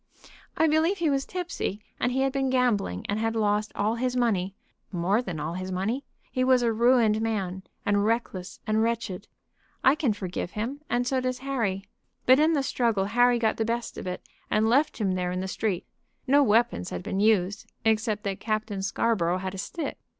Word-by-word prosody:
"I 320 - +4
believe 320 +5 +3
he 330 -4 +1
was 275 0 0
tipsy, 355 - -3 0.2
and 245 - +1
he 265 +2 0
had 270 0 +2
been 270 -1 0
gambling, 230 - +1
and 205 +1 -1
had 225 0 0
lost 210 -1 +1
all 210 +2 +1
his 250 +2 -1
money 200 -6 +1 0.4
more 190 +5 +1
than 175 -10 -5
all 155 +3 -3
his 185 +1 -4
money. 210 +9 -1 0.3
He 255 - 0
was 255 -1 +4
a 230 -1 +2
ruined 230 -2 +4
man, 195 -5 -2 0.2
and 205 0 +2
reckless 210 -4 -2
and 215 0 +2
wretched. 225 -4 -2 0.6
I 265 - +6
can 290 -7 +1
forgive 180 -3 -5
him, 245 +7 -3
and 245 0 +1
so 260 +1 +1
does 255 0 -1
Harry. 205 -8 -1 0.4
But 260 +2 +6
in 315 +2 +4
the 285 -3 +1
struggle 230 -7 +1
Harry 245 +3 +4
got 225 -2 +1
the 225 - +1
best 235 +1 -2
of - - -6
it, 180 - -4 0.3
and 215 +1 +2
left 275 +6 +3
him 205 -4 0
there 180 -1 -1
in 180 - -2
the 190 - -3
street. 195 -1 -2 0.4
No 285 +2 +5
weapons 215 - +2
had 90 0 -5
been 195 - -2
used, 205 -2 +2
except 220 -1 +1
that 195 -1 -3
Captain 215 -2 -2
Scarborough 190 -3 +1
had 190 0 -4
a 195 - -6
stick. 315 - -4
220 Hz, 200 wpm, -27 LUFS, 195-250 Hz, 0.6 s, I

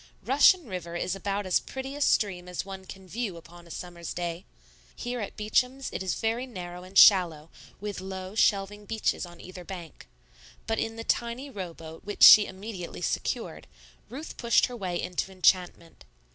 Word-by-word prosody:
Russian 290 +6 +5
River 180 -5 -6
is 180 +2 -1
about 200 +1 -2
as 185 - +3
pretty 265 +1 -7
a 290 - -6
stream 185 -9 +1
as 180 +1 -4
one 190 -1 -8
can 190 0 -11
view 205 -3 -4
upon 170 +1 -14
a - - -16
summer's 170 0 -7
day. 175 0 -4 0.5
Here 245 0 -4
at 205 - -6
Beacham's 250 +5 0
it - - -3
is 185 -4 -1
very 230 +3 -1
narrow 180 -6 -7
and 185 +2 -6
shallow, 165 -5 +6 0.3
with 205 -2 -5
low, 190 0 -6
shelving 205 -1 +1
beaches 220 -4 -1
on 175 -1 -14
either 185 0 -10
bank; 175 -3 -9 0.6
but 225 0 -1
in 225 0 -2
the 225 - -6
tiny 240 +5 -2
row 185 -6 -6
boat 160 0 -11
which 205 - -1
she 210 - +11
immediately 190 -2 -7
secured, - - -3 0.4
Ruth 280 +7 -8
pushed 235 -1 +4
her 250 - -7
way 185 -6 -3
into 180 +1 -3
enchantment. 180 -2 +1
190 Hz, 175 wpm, -28 LUFS, 180-225 Hz, 0.6 s, she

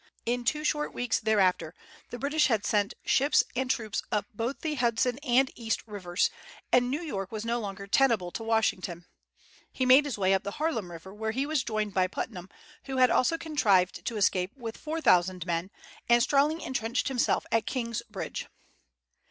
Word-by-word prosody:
In 245 +1 -1
two 300 +5 0
short 300 0 -1
weeks 245 -1 0
thereafter 190 -7 +1 0.3
the 245 - -6
British 290 +4 +2
had 220 -6 0
sent 205 -1 +1
ships 280 +3 +4
and 260 0 -1
troops 220 -5 -1
up 210 - 0
both 230 +6 -3
the 315 -2 -2
Hudson 245 -1 +1
and 265 -1 +2
East 225 -2 -2
rivers, 190 -4 -1 0.4
and 245 0 +4
New 295 +6 -2
York 195 - -4
was 215 0 -5
no 235 +1 0
longer 200 -2 -6
tenable 210 -5 +2
to - - -5
Washington. 195 -6 -1 0.7
He 260 - -1
made 260 +3 +7
his 275 -7 -3
way 190 -1 +2
up 190 - +2
the 200 - -6
Harlem 300 - -1
River, 170 +3 -10
where 220 +1 -3
he 260 +5 -1
was 300 -4 0
joined 215 -3 -2
by 185 -1 +2
Putnam, 185 -1 -6 0.4
who 265 -1 -3
also 260 +6 +3
had 330 - -8
contrived 205 - +2
to 230 - -2
escape 190 +2 +1
with 230 -3 -6
four 320 +1 -4
thousand 180 - +3
men, 170 +1 -2 0.4
and 235 0 +6
strongly 295 +5 +2
intrenched 240 0 -1
himself 260 -3 +1
at 225 -1 +1
King's 235 -3 -2
Bridge. 205 -3 -5
230 Hz, 185 wpm, -28 LUFS, 200-265 Hz, 0.7 s, made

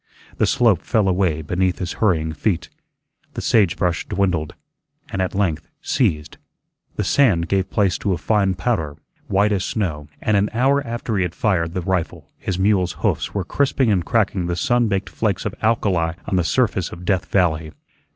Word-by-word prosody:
The - - +2
slope 110 -8 +3
fell 110 -5 +1
away 90 -4 +1
beneath 90 +3 0
his 90 -2 -4
hurrying 80 -7 +2
feet; 85 +3 -1 0.7
the - - -3
sage 100 -7 +3
brush 90 -1 -1
dwindled, 90 -6 -1 0.6
and 95 - -1
at 95 - -2
length 95 -6 0
ceased; 80 - -1 0.6
the - - -1
sand 95 -12 +3
gave 95 0 0
place 100 -4 +1
to 100 - -1
a - - -1
fine 100 +2 +1
powder, 85 -7 -1 0.3
white 100 +2 +2
as 95 -3 0
snow; 80 -9 -2
and 110 - +1
an 100 +1 +2
hour 135 +4 +3
after 115 -2 -3
he - - +1
had 90 -2 -2
fired 85 -5 0
the 90 - -1
rifle 90 -2 -3
his 95 - -3
mule's 95 -2 +2
hoofs - - 0
were 100 -3 -1
crisping 135 -2 +1
and 90 -4 +2
cracking 100 -5 0
the 85 - -1
sun 120 +6 +2
baked 100 -2 -1
flakes 105 -4 -1
of 105 - -2
alkali 95 -7 +1
on - - -1
the 90 - +2
surface 100 -1 0
of 85 +1 -9
Death 95 -2 0
Valley. 80 -4 +1
95 Hz, 180 wpm, -21 LUFS, 85-105 Hz, 0.7 s, slope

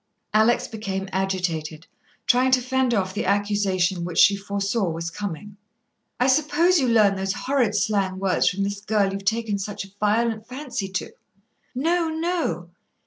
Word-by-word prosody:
Alex 220 +3 +3
became 195 -3 -4
agitated, 175 -4 -2 0.4
trying 255 +1 +3
to 260 0 +4
fend 260 0 0
off 190 -4 0
the 210 - -2
accusation 195 -3 +1
which 175 -1 -5
she 200 - +6
foresaw 200 0 -1
was 165 +1 -4
coming. 205 +1 -6 0.6
"I 250 - +3
suppose 310 +6 +3
you 260 - +1
learn 215 -4 +4
those 190 0 -1
horrid 250 -6 0
slang 200 -2 0
words 190 -1 +2
from 195 +2 -2
this 200 0 -3
girl 205 -2 +1
you've 195 0 -6
taken 220 -2 0
such 200 0 -5
a 195 - -17
violent 220 +1 0
fancy 250 -6 -5
to." 185 - -4 0.6
"No, 330 +5 +1
no." 320 - -2
205 Hz, 155 wpm, -23 LUFS, 190-240 Hz, 0.6 s, she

